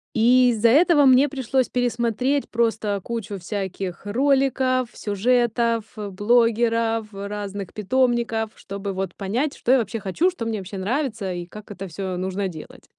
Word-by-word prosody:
И 245 +2 +5
из-за 230 0 +3
этого 305 +3 +5
мне 265 +1 +6
пришлось 260 -2 0
пересмотреть 245 +3 0
просто 220 -3 0
кучу 225 -4 -4
всяких 190 -1 -5
роликов, 260 +2 +2
сюжетов, 230 +2 +1
э, 210 -1 -4
блогеров, 230 +1 +2
разных 200 -1 -6
питомников, 230 0 0
чтобы 200 0 -6
вот 190 -1 -3
понять, 240 +9 -2
что 250 - +2
я - - +6
вообще 225 0 -3
хочу, 210 - +1
что 245 -10 -6
мне 225 -2 -2
вообще 195 +1 -7
нравится 220 -2 -2
и 175 -1 -5
как 210 +4 -12
это 195 -2 -7
всё 185 +2 -4
нужно 190 +2 -2
делать. 160 -4 -10
225 Hz, 150 wpm, -23 LUFS, 200-250 Hz, -, мне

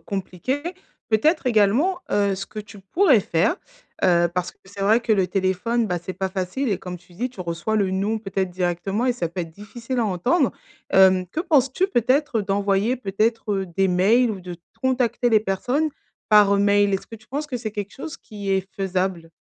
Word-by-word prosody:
compliqué. 200 +8 -3 0.5
Peut-être, 270 +7 +2
également, 245 - +3
heu, 200 -1 +2
ce 195 - -5
que 215 - -9
tu 210 -1 -9
pourrais 270 - +3
faire, 170 - +1 0.5
heu, 175 -1 +4
parce 180 -1 -1
que - - -30
c'est 200 +1 -11
vrai 215 +4 +4
que 230 -2 +1
le 190 -3 +2
téléphone, 200 +5 0
bah, 180 -2 -1
c'est 185 - -5
pas 190 0 -3
facile 190 +8 -2
et 200 - +1
comme 180 -1 -7
tu 180 +1 -22
dis, 245 +7 -3
tu 195 - -11
reçois 170 +5 -2
le 195 -3 +1
«Non» 205 +4 0
peut-être 195 -3 -2
directement 180 +6 -1
et 250 - +3
ça 175 -9 -3
peut 180 +2 -5
être 165 - -5
difficile 230 +6 -6
à 230 - +1
entendre, 240 - +1 0.4
hem, 190 -1 +5
que 305 - -6
penses-tu 300 +1 +2
peut-être 255 - +1
d'envoyer 200 +4 +1
peut-être, 220 0 -1
heu, 195 -1 -1
des 190 +3 0
mails 215 +7 +3
ou 195 -3 -5
de 175 -1 -8 0.2
de - - -40
contacter 250 -2 +1
les 220 -2 +4
personnes 245 +10 0 0.4
par 205 -2 +6
mail? 200 0 +3
Est-ce 190 - -4
que 225 - -9
tu 220 - -22
penses 290 +3 -3
que 250 - -3
c'est 220 -3 -5
quelque 205 -2 -5
chose 315 +4 -7
qui 205 -2 -9
est 190 -1 +1
faisable? 185 -3 -2
205 Hz, 205 wpm, -23 LUFS, 190-240 Hz, 0.5 s, par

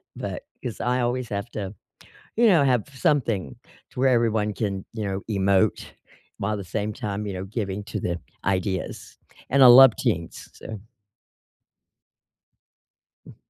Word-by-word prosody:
but - - -5 0.2
'cause 120 -3 -5
I 125 +1 +1
always 120 0 -1
have 100 +3 -4
to, 100 -2 -5 0.6
you 235 - +5
know, 175 -8 +5
have 125 -5 +2
something 115 - 0 0.4
to - - -9
where 135 +1 +4
everyone 110 -4 +1
can, 100 -3 -3
you 110 -2 -4
know, 95 0 -3
emote 100 -2 +2 0.5
while 105 +2 -2
at - - -2
the 100 - -6
same 105 +4 -3
time, 105 0 -4
you 100 - -4
know, 95 0 -5
giving 100 -1 -4
to 110 -1 -4
the 85 -2 -2 0.3
ideas, 95 -1 -2 0.3
and 140 0 +5
I - - +10
love 125 -1 +9
teams, 85 0 -2
so 110 -2 -8 2.5
Mm. - - -13
105 Hz, 150 wpm, -24 LUFS, 95-120 Hz, 2.5 s, I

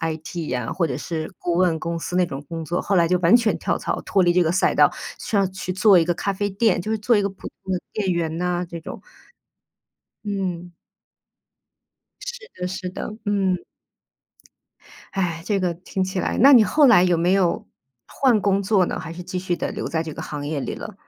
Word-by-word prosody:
IT 160 0 -4
呀， 125 -2 -2
或 170 - 0
者 130 -5 -3
是 160 +1 -4
顾 175 - -2
问 175 -3 +2
公 170 0 -3
司 180 - -4
那 180 - +4
种 140 -3 -6
工 165 -1 -5
作， 175 +3 -1
后 195 - 0
来 170 -1 +4
就 180 +1 +2
完 175 +6 +6
全 230 -3 +1
跳 - - -1
槽， - - -3
脱 195 - +3
离 175 -1 +4
这 180 0 +4
个 160 - +1
赛 180 - +2
道， - - +5 0.3
说 215 - -1
要 195 - +2
去 185 -1 -6
做 190 0 +5
一 165 - +2
个 175 - +1
咖 200 +3 -2
啡 205 +1 -2
店， 200 -1 +1
就 215 +5 -4
是 220 - +1
做 220 +3 +2
一 205 - +4
个 200 - 0
普 190 - -11 0.2
通 190 - -4
的 - - 0
店 200 -3 -1
员 165 -2 -1
呐 180 0 -1
这 170 -1 -7
种。 - - -9 1.2
嗯。 185 -4 -3 1.5
是 475 -2 -8
的 180 - -1
是 185 0 -5
的， 185 - -6
嗯。 195 -3 +1 1.6
唉， 170 -4 -2
这 200 -1 0
个 175 -2 0
听 185 +2 -4
起 185 0 -2
来 - - -2
那 275 +4 +8
你 230 - +8
后 295 +6 +4
来 225 -8 +7
有 175 -2 +2
没 175 +2 +2
有 185 -3 +1 0.4
换 245 -6 +2
工 200 0 +1
作 195 -2 +3
呢， - - -3
还 165 - -7
是 180 - -8
继 185 +1 -4
续 180 -1 -1
地 - - -3
留 - - -4
在 160 -1 -1
这 160 -2 -7
个 - - -6
行 145 -1 -5
业 150 -1 -2
里 135 - -3
了？ 215 - -8
180 Hz, 240 characters per minute, -22 LUFS, 170-200 Hz, 1.6 s, 那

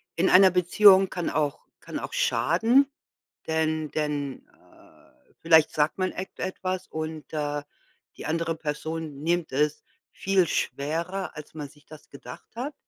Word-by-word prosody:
in 180 +3 +2
einer 190 0 +7
Beziehung 190 +2 +6
kann 175 -2 -3
auch 145 -2 -1
kann - - -7
auch - - -6
schaden, 280 - +3 0.6
denn 160 -1 -1
denn, 145 -3 -3
äh, - - -24
vielleicht 160 -2 +5
sagt 150 +4 0
man 185 0 0
et 185 - -6
etwas 185 0 -3
und, 155 -1 -6
äh, 145 -1 -2 0.6
die - - -8
andere 165 +1 -1
Person 155 -1 -5
nimmt 170 +1 0
es 150 +3 0 0.3
viel 190 -2 +1
schwerer, 170 +8 -2
als 150 -1 -10
man 150 -3 -7
sich 150 +2 -22
das 155 -1 -14
gedacht 125 -3 -11
hat? 265 +6 -4
160 Hz, 145 wpm, -26 LUFS, 150-185 Hz, 0.6 s, einer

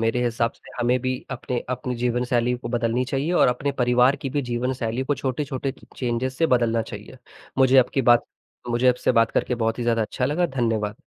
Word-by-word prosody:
मेरे 115 +2 +1
हिसाब 115 0 0
से - - -17
हमें 125 +1 +2
भी 130 +1 -1 0.2
अपने 125 -1 -3
अपनी 125 0 -3
जीवनशैली 120 0 0
को - - -6
बदलनी 120 +1 0
चाहिए 135 +6 -1
और 175 - +4
अपने 140 +3 -1
परिवार 125 +1 +3
की 135 - -5
भी 145 +1 -1
जीवनशैली 125 0 -2
को 145 - 0
छोटे-छोटे 135 0 -3
च - - -19
चेंजेज़ 125 +1 -1
से 165 - +2
बदलना 120 -4 +2
चाहिए। 110 +3 -10 0.4
मुझे 130 0 +6
आपकी 130 +1 +2
बात 120 -1 +5 0.5
मुझे 120 +2 +3
आपसे 125 0 +2
बात 115 -1 +3
करके 125 - 0
बहुत 115 -1 -1
ही - - -2
ज़्यादा 115 -1 +1
अच्छा 125 +4 -2
लगा। 165 +6 +1
धन्यवाद। 115 -7 -1
125 Hz, 200 wpm, -23 LUFS, 120-130 Hz, 0.5 s, मुझे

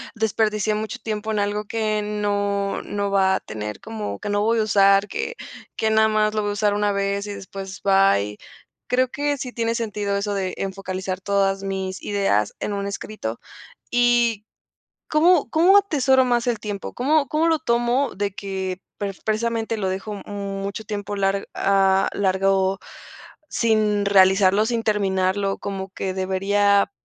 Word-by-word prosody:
desperdicié 215 -1 0
mucho 215 0 -4
tiempo 220 0 -3
en 215 - 0
algo 205 +1 -1
que 215 0 -1
no 205 -1 -1
no 200 -1 -3
va 190 -1 +3
a - - -1
tener, 105 -1 -6
como 220 -2 -5
que 210 - -5
no 205 0 +1
voy 225 +2 +2
a - - +3
usar 200 -1 +4
que 470 - -4 0.4
que 220 - 0
nada 220 0 +4
más 215 0 +1
lo 215 - 0
voy 205 0 -1
a - - -2
usar 205 0 +1
una 205 0 +1
vez 200 0 -1
y 205 - -4
después 195 0 -8
bye, 195 - +3 0.5
creo 255 +1 +2
que 290 +2 -1
sí 250 -2 -6
tiene 230 0 -1
sentido 210 -3 -2
eso 205 +1 -2
de 190 -2 -2
focalizar 190 -1 -4
todas 195 0 +1
mis 190 -1 -4
ideas 195 - +1
en 205 - -3
un 200 0 -3
escrito 200 - -5 0.5
y, 240 -3 +2 0.6
¿cómo 325 +1 +4
cómo 355 +5 +5
atesoro 270 -9 +3
más 240 -1 +1
el 235 -3 0
tiempo? 205 -2 -5
¿Cómo 285 +3 +2
cómo 310 +5 +1
lo 325 -1 +3
tomo 240 0 +1
de 200 +1 -1
que 190 -2 -4 0.5
precisamente 225 +1 -1
lo 195 -3 -1
dejo 195 +2 -5
mucho 200 0 -5
tiempo 205 0 -4
lar 195 0 0
a 195 -1 +3
alargo 195 0 +1 0.7
sin 215 -3 +1
realizarlo, 195 +1 +5
sin 230 0 -1
terminarlo?¿Como 195 -1 -1
que 190 0 -3
debería 200 - +2
205 Hz, 155 wpm, -22 LUFS, 195-220 Hz, 0.7 s, cómo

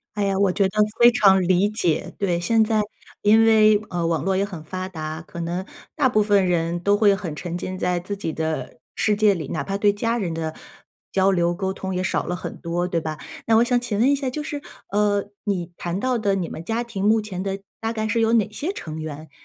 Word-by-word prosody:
哎 205 - 0
呀， 195 -1 0
我 195 -2 +3
觉 195 +1 +2
得 210 +2 +2 0.2
非 240 0 +9
常 195 -5 +5
理 185 +3 +3
解， 210 -7 -1
对， 180 -4 +1
现 225 +6 +2
在 215 -1 +2 0.4
因 220 +2 +5
为， 215 -1 +5
呃， 175 -2 -2
网 165 -1 0
络 190 0 +1
也 195 - +2
很 190 -6 -6
发 185 +4 -5
达， 155 -2 -5
可 170 - -9
能 175 +3 -3 0.3
大 260 -3 +3
部 215 - +3
分 205 -2 +3
人 170 -1 0
都 200 +1 +3
会 205 -2 +5
很 185 -6 -5
沉 175 +3 -5
浸 185 +1 -5
在 180 0 0
自 190 +3 -5
己 160 -5 -3
的 160 0 -3 0.2
世 210 -1 +1
界 210 -1 +4
里， 160 -6 -5
哪 155 - -2
怕 195 +6 -3
对 205 0 +3
家 230 +3 -1
人 180 -7 -2
的 160 -1 -3 0.6
交 195 0 +4
流 175 -1 +1
沟 190 +1 -2
通 190 -1 -4
也 185 - -1
少 190 - 0
了 180 - -2
很 180 - -6
多， 170 +1 -2
对 170 - 0
吧？ 155 -1 -4 0.3
那 225 - +3
我 230 - +6
想 245 0 +2
请 240 -4 -3
问 245 +6 +4
一 - - +4
下 275 -2 -1
就 300 +4 -4
是， 290 -1 -5 0.3
呃， 205 0 +2 0.2
你 180 -4 -2
谈 175 +1 -3
到 255 +4 0
的 205 -3 +1
你 180 -4 -2
们 - - -7
家 225 +7 -2
庭 225 -5 -6
目 220 +1 +4
前 195 -4 -5
的 195 0 -3 0.2
大 225 +1 -2
概 220 -1 -2
是 225 +2 0
有 225 0 +3
哪 215 -3 +2
些 320 - -3
成 155 - -7
员， 155 0 -7
195 Hz, 260 characters per minute, -23 LUFS, 175-215 Hz, 0.6 s, 非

